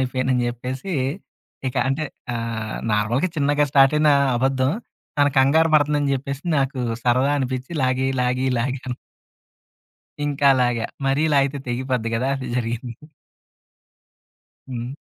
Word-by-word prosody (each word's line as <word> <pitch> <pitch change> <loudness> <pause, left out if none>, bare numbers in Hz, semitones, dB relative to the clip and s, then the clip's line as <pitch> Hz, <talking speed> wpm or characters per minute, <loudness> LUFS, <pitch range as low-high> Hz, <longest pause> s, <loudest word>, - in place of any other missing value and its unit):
అయిపోయాను" 130 0 -1
అని 125 -1 +1
చెప్పేసి, 130 +9 -5 0.8
ఇక - - -7
అంటే 135 +3 -1 0.3
ఆహ్, 115 -2 -4 0.2
నార్మల్‌గా 115 - +1
చిన్నగా 145 0 +2
స్టార్టయిన 145 +2 +5 0.3
అబద్ధం 130 +2 +1 0.5
తన 145 - +5
కంగారు 155 +5 +4
పడుతుందని 145 -1 +3
చెప్పేసి, 140 +1 -4 0.2
నాకు 135 0 -1 0.3
సరదా 130 +3 +3
అనిపించి 130 +2 -3
లాగి 130 +1 +1 0.2
లాగి 125 +1 0
లాగ‌ను. 130 0 -3 1.3
ఇంకా 140 -1 +3
లాగా. 120 -2 +1 0.2
మరి 135 +3 +2
లాగితే 140 0 +2
తెగిపోద్ది 125 -2 -1
కదా! 130 +4 0
అదే 130 -1 -5
జరిగింది. 120 0 -3 1.7
హ్మ్. 120 -1 -5
130 Hz, 115 wpm, -22 LUFS, 125-140 Hz, 1.7 s, స్టార్టయిన